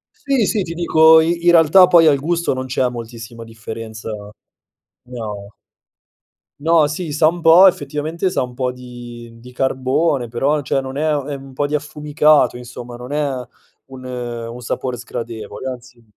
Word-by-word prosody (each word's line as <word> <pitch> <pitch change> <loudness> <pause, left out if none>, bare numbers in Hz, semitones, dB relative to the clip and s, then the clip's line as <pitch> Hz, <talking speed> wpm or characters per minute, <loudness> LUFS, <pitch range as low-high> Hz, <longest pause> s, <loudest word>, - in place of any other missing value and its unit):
Sì, 270 -6 0
sì, 210 -1 0
ti 165 -1 -6
dico, 160 -1 +5
i 170 +1 -1
in 175 - +7
realtà 175 +2 +6
poi 170 -2 +6
al 145 -2 +4
gusto 170 +2 -1
non 130 0 -4
c'è 130 0 0
moltissima 115 -1 -9
differenza, 110 0 -8 0.9
no. 105 -5 -7 1.1
No, 160 -1 +4
sì, 155 0 -5
sa 155 +2 +3
un 175 +1 -5
po' 170 +4 +7
effettivamente 155 +3 -1
sa 155 - -1
un 125 - -8
po' 125 0 -2
di 120 -2 -11
di 125 +2 -14
carbone 130 +1 0
però 135 +6 0
cioè 135 0 -1
non 135 +1 -7
è 155 +1 0
è 145 -1 -2
un 135 0 -11
po' 145 +2 -1
di 150 - -6
affumicato, 150 -2 +2
insomma 120 0 -9
non 125 +3 -8
è 150 -2 0 0.5
un 130 -1 -12
un 120 -1 -6
sapore 125 +1 -4
sgradevole, 115 0 -7
anzi 125 -1 -11
135 Hz, 165 wpm, -18 LUFS, 120-155 Hz, 1.1 s, in